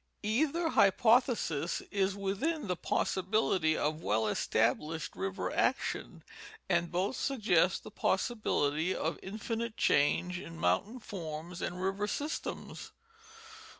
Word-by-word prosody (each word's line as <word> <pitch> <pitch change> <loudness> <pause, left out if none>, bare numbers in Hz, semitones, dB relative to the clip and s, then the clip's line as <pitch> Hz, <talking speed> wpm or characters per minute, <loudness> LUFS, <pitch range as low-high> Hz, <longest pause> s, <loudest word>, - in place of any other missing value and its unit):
Either 305 +10 +1
hypothesis 220 - +3
is 195 -1 +1
within 215 +10 -1
the 180 -2 -1
possibility 185 -3 +1
of 155 +2 -1
well 110 -3 +1
established 150 +9 0
river 95 +1 -3
action, - - -1 0.4
and 175 -2 +1
both 185 +7 0
suggest 245 -4 +2
the - - -10
possibility 170 - 0
of - - -2
infinite 225 +3 -4
change 180 +5 +2
in 165 -3 -9
mountain 95 - +1
forms 170 -4 -6
and 180 +1 -3
river 195 +2 0
systems. 295 +8 -4
190 Hz, 110 wpm, -32 LUFS, 160-220 Hz, 0.4 s, hypothesis